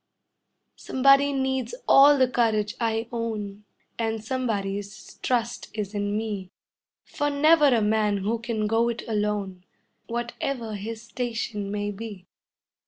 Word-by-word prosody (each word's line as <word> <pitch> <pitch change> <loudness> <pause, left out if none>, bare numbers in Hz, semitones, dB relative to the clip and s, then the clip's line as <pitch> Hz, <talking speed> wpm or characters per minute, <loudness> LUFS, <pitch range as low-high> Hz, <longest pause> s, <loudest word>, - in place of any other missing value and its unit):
] - - -52
Somebody 275 +2 +5
needs 265 - -1
all 285 +1 +8
the 260 -1 +4
courage 220 -4 +1
I 225 -1 0
own, 210 -3 -4 0.3
And 225 -1 -2
somebody's 205 -5 -3
trust 240 -2 -1
is 210 -1 -3
in 205 0 -1
me; 205 -4 -4 0.5
For 290 0 -2
never 300 +2 +5
a 240 -5 +3
man 210 -1 +2
who 215 +4 -1
can 230 -2 -2
go 225 +2 +2
it 235 0 -4
alone, 210 -4 -2 0.4
Whatever 235 0 -3
his 220 +2 -6
station 225 -5 -3
may 205 0 -2
be. 205 -3 -8
225 Hz, 130 wpm, -25 LUFS, 210-245 Hz, 0.5 s, all